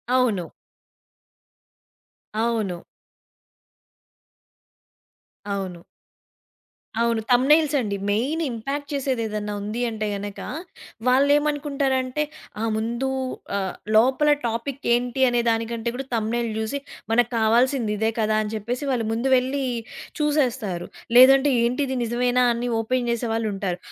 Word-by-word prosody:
అవును. 215 -10 +1 1.9
అవును. 220 -5 0 2.8
అవును. 185 -3 -5 1.2
అవును. 230 -1 +1
థంబ్‌నెయిల్స్ 295 +5 +5
అండి. 205 -4 -2
మెయిన్ 260 +11 0
ఇంపాక్ట్ 275 +6 -4
చేసేదేదన్నా 225 -6 -2
ఉంది 215 +4 -3
అంటే 215 -1 -3
గనక 200 0 -6 0.7
వాళ్ళేమనుకుంటారంటే 280 0 +2 0.4
ఆహ్, 225 - 0
ముందు 235 +4 -1 0.5
ఆహ్, 190 -2 -2 0.2
లోపల 260 +6 +4 0.2
టాపిక్ 235 +4 -3
ఏంటి 245 +2 0
అనే 240 0 +2
దానికంటే 230 +1 -1
కూడా 270 +1 -4
థంబ్‌నెయిల్ 230 +1 0
జూసి 220 +6 -2 0.3
"మనకావాల్సింది 235 +1 +2
ఇదే 220 +2 +1
కదా!" 215 0 +2
అని 210 - -5
చెప్పేసి 240 +6 -3
వాళ్ళు 235 -4 0
ముందు 235 +4 -1
వెళ్ళి 265 +2 -1 0.6
చూసేస్తారు. 255 - 0 0.3
లేదంటే 270 +2 +8
"ఏంటిది 260 +2 0
నిజమేనా?" 245 +2 +1
అని 240 +1 -2
ఓపెన్ 245 +2 0
చేసేవాళ్ళుంటారు. 220 -6 -1
235 Hz, 100 wpm, -24 LUFS, 220-265 Hz, 2.8 s, లేదంటే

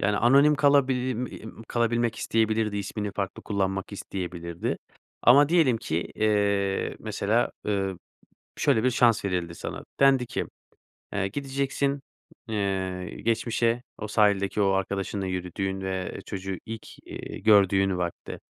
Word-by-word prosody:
Yani, 100 +1 +1
anonim 140 +5 +5
kalabi 140 -2 +4
i 125 +1 -1 0.3
im 110 0 -10
kalabilmek 120 -1 +1
isteyebilirdi 110 -2 +1
ismini 100 0 -3
farklı 100 -2 -4
kullanmak 95 -1 -2
isteyebilirdi. 85 -3 -4 0.4
Ama 140 +4 +7
diyelim 160 -8 +4
ki, 85 -5 -2
eee, 100 -2 +1
mesela, 110 +2 0 0.2
ııı, 95 -3 -1 0.6
şöyle 110 +2 +2
bir 130 - +4
şans 120 -4 +3
verildi 90 -3 -2
sana, - - -6 0.2
dendi 135 -2 +5
ki, - - -3 0.7
"Eee, 100 -1 0
gideceksin, 140 +3 -1 0.5
eee, 95 -3 -2
geçmişe 115 +1 +1
o 110 - -5
sahildeki 105 -1 +2
o 100 -1 +3
arkadaşınla 95 0 -1
yürüdüğün 95 +1 -3
ve, 95 -1 -3
eee, - - -7
çocuğu 95 -2 -4
ilk, 115 0 -7 0.2
iii, - - -7
gördüğün 95 -3 +4
vakte, 85 -1 -4
105 Hz, 130 wpm, -26 LUFS, 95-120 Hz, 0.7 s, Ama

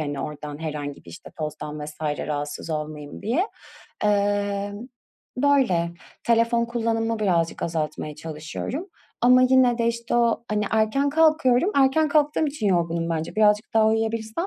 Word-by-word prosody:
hani, 145 -2 -3
oradan 150 -1 -6
herhangi 145 - -5
bir, 85 - -12
işte, - - -11
tozdan 150 -1 -5
vs. 150 +1 -10
rahatsız 145 +1 -3
olmayayım, 150 -1 -5
diye. 280 - +1 0.6
Emm, 205 +1 0 0.5
böyle, 250 -12 +2 0.3
telefon 235 0 +3
kullanımımı 230 -1 -1
birazcık 170 -5 0
azaltmaya 155 -2 -3
çalışıyorum. 160 - -6 0.4
Ama 250 +1 +6
yine 255 -2 +4
de, 230 - +1
işte, 235 0 -2
o, 235 0 +2
hani, 210 -1 0
erken 225 +6 +2
kalkıyorum. 310 0 +3
Erken 280 +3 +4
kalktığım 300 +1 +2
için 280 -7 -3
yorgunum 170 -2 0
bence. 160 -1 -3
Birazcık 210 +1 +3
daha 220 -1 +5
uyuyabilsem, 225 - -1
215 Hz, 135 wpm, -24 LUFS, 155-245 Hz, 0.6 s, Ama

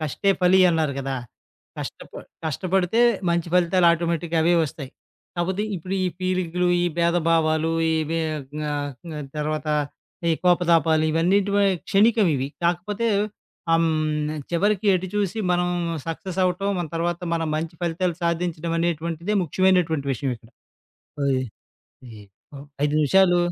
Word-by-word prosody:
'కష్టే 155 +6 0
ఫలి' 185 +1 +5
అన్నారు 160 -3 0
కదా! 135 0 -3 0.6
కష్టప - - -7 0.3
కష్టపడితే 185 - 0 0.3
మంచి 170 0 0
ఫలితాలు 180 0 +3
ఆటోమేటిక్‌గా 170 0 -1
అవే 170 +2 +3
వస్తాయి. 140 -3 -7 0.4
కాకపోతే 185 +3 -1
ఇప్పుడు 185 +3 -5
ఈ - - +2
పీలికలు, 180 -1 0
ఈ - - +2
భేదభావాలు 165 -2 +2 0.2
ఇవే 160 +1 0
ఆహ్, 150 - -5
గ్నా 150 0 -3 0.4
క 150 -1 -5 0.2
తర్వాత 155 0 -2 0.6
ఈ - - +4
కోపతాపాలు 165 -3 +3
ఇవన్నీటి 185 +5 +2
వ - - +4 0.3
క్షణీికం 215 +1 +4
ఇవి. 130 +1 -2 0.2
కాకపోతే 190 +6 0 0.6
హ - - +4
హ్మ్. 155 -2 0 0.2
చివరికి 200 +4 +1
ఎటు 185 +1 -2
చూసి 205 +1 -1
మనం 175 0 +1 0.4
సక్సెస్ 180 +3 -4
అవ్వటం. 185 +2 0
మన 170 - -2
తర్వాత 170 +1 -1
మనం 165 -1 -1
మంచి 165 +1 -4
ఫలితాలు 175 0 -1
సాధించడం 170 -1 -1
అనేటువంటిదే 170 +4 -1
ముఖ్యమైనటువంటి 170 -4 +1
విషయం 130 +2 -2
ఇక్కడ. 115 +1 -21 0.7
ఓయి 130 -2 +1 0.7
ఈ - - -11 0.4
ఓహ్! 140 +1 -11 0.2
5 150 0 +1
నిమిషాలు 175 +4 +4
170 Hz, 135 wpm, -23 LUFS, 155-180 Hz, 0.7 s, ఫలి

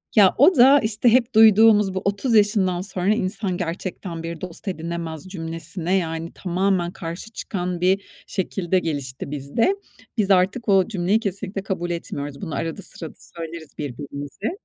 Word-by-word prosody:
Ya, 200 -4 +6
o 315 +8 +6
da, 270 +2 +7
işte, 220 +1 +2
hep 240 0 +2
duyduğumuz 215 -2 +6
bu 190 - -2
"30 205 +4 +1
yaşından 205 -4 +3
sonra 195 +1 0
insan 195 -2 -2
gerçekten 175 -1 -5
bir 165 -1 -6
dost 185 +3 -7
edinemez." 165 -3 -4
cümlesine, 165 0 -4
yani, 165 -1 -3
tamamen 185 -1 0
karşı 170 +4 -7
çıkan 180 -5 -4
bir 190 +2 +3 0.3
şekilde 185 -1 -1
gelişti 140 -5 -4
bizde. 150 - 0 0.4
Biz 205 -3 +2
artık 195 +5 +2
o 195 -2 +4
cümleyi 200 0 +1
kesinlikle 195 -1 -4
kabul 180 -3 -3
etmiyoruz. 145 -4 -5
Bunu 170 -6 -4
arada 165 +4 -3
sırada 165 -4 -8
söyleriz 165 -2 -9
birbirimize. 145 - -5
185 Hz, 150 wpm, -23 LUFS, 165-205 Hz, 0.4 s, da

